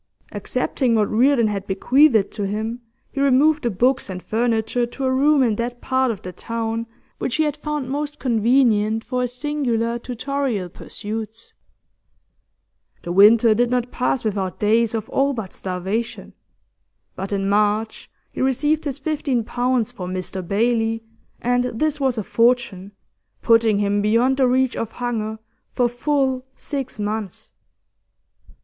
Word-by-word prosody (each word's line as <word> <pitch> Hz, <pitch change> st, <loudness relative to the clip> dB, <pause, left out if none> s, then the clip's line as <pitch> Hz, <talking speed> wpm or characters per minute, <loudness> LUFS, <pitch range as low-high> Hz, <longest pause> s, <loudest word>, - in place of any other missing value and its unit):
Accepting 250 Hz, -4 st, 0 dB
what 210 Hz, -2 st, +1 dB
Reardon 245 Hz, +2 st, +4 dB
had 200 Hz, -2 st, -2 dB
bequeathed 230 Hz, +2 st, +3 dB
to 205 Hz, -2 st, -3 dB
him, 220 Hz, +4 st, -3 dB, 0.3 s
he 275 Hz, -, -3 dB
removed 285 Hz, +3 st, +4 dB
the 240 Hz, -, 0 dB
books 245 Hz, +4 st, +1 dB
and 185 Hz, -1 st, -5 dB
furniture 230 Hz, +1 st, 0 dB
to 270 Hz, +3 st, -7 dB
a 260 Hz, -, +1 dB
room 285 Hz, +1 st, +4 dB
in 220 Hz, -4 st, +1 dB
that 240 Hz, +1 st, -3 dB
part 260 Hz, 0 st, +1 dB
of 215 Hz, -5 st, -4 dB
the 185 Hz, -, -7 dB
town 230 Hz, +3 st, -3 dB, 0.3 s
which 250 Hz, -, -2 dB
he 315 Hz, -, +2 dB
had 295 Hz, -2 st, -1 dB
found 300 Hz, -3 st, -3 dB
most 295 Hz, +2 st, -3 dB
convenient 225 Hz, -3 st, +2 dB
for 250 Hz, +1 st, -2 dB
his 250 Hz, -1 st, -1 dB
singular 245 Hz, -4 st, -1 dB
tutorial 250 Hz, -5 st, -3 dB
pursuits. 220 Hz, +4 st, -7 dB, 1.5 s
The 175 Hz, -, -4 dB
winter 215 Hz, +4 st, +6 dB
did 240 Hz, +2 st, +1 dB
not 245 Hz, 0 st, -1 dB
pass 250 Hz, -1 st, -1 dB
without 195 Hz, -3 st, -2 dB
days 225 Hz, +2 st, +2 dB
of 220 Hz, -1 st, -3 dB
all 275 Hz, +1 st, +1 dB
but 220 Hz, -7 st, -6 dB
starvation, 190 Hz, +5 st, -4 dB, 0.8 s
but 190 Hz, +2 st, -5 dB
in 195 Hz, -1 st, -1 dB
March 210 Hz, +2 st, 0 dB, 0.2 s
he -, -, -5 dB
received 295 Hz, +4 st, +1 dB
his 280 Hz, -2 st, -2 dB
fifteen 280 Hz, -5 st, -1 dB
pounds 245 Hz, 0 st, 0 dB
for 180 Hz, -, -7 dB
'Mr 185 Hz, +1 st, -4 dB
Bailey,' 225 Hz, +4 st, 0 dB, 0.4 s
and 245 Hz, +1 st, +2 dB
this 300 Hz, +5 st, -1 dB
was 265 Hz, -3 st, +1 dB
a 215 Hz, -, -1 dB
fortune, 230 Hz, -5 st, +1 dB, 0.5 s
putting 230 Hz, -3 st, +4 dB
him 205 Hz, 0 st, +1 dB
beyond 230 Hz, +5 st, +2 dB
the 265 Hz, -2 st, +4 dB
reach 260 Hz, 0 st, +2 dB
of 230 Hz, -1 st, -4 dB
hunger 220 Hz, -3 st, -3 dB, 0.4 s
for 245 Hz, -, +2 dB
full 260 Hz, +1 st, 0 dB
six 275 Hz, -5 st, -4 dB
months. 210 Hz, -2 st, -4 dB
235 Hz, 150 wpm, -21 LUFS, 215-260 Hz, 1.5 s, winter